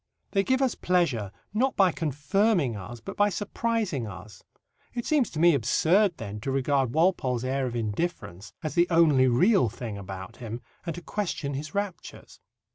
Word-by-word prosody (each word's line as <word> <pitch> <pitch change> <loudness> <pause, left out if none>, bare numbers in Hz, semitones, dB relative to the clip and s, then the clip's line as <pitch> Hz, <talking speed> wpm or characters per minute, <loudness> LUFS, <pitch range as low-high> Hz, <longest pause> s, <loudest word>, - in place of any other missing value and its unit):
They 195 -1 +2
give 260 +4 +2
us 255 - +2
pleasure 145 - 0 0.2
not 255 +5 +1
by 190 -3 +4
confirming 155 - +1
us, 105 +5 -8
but 115 - -8
by 205 0 +3
surprising 205 - -2
us. 95 +1 -10 0.5
It 240 - -3
seems 290 -6 +2
to 155 - -6
me 170 +1 +6
absurd, 165 - +3
then, 105 -3 -6
to 120 - -4
regard 135 -1 +1
Walpole's 145 -8 +2
air 130 0 -1
of 120 - -5
indifference 105 - -3
as 155 - -3
the 175 0 +3
only 155 -6 +5
real 170 - +4
thing 110 -2 -6
about 95 -1 -8
him 115 -1 -6 0.3
and 165 - -2
to 175 - -8
question 170 -9 -3
his 145 +4 -6
raptures. 200 -3 -5
145 Hz, 170 wpm, -27 LUFS, 120-190 Hz, 0.5 s, me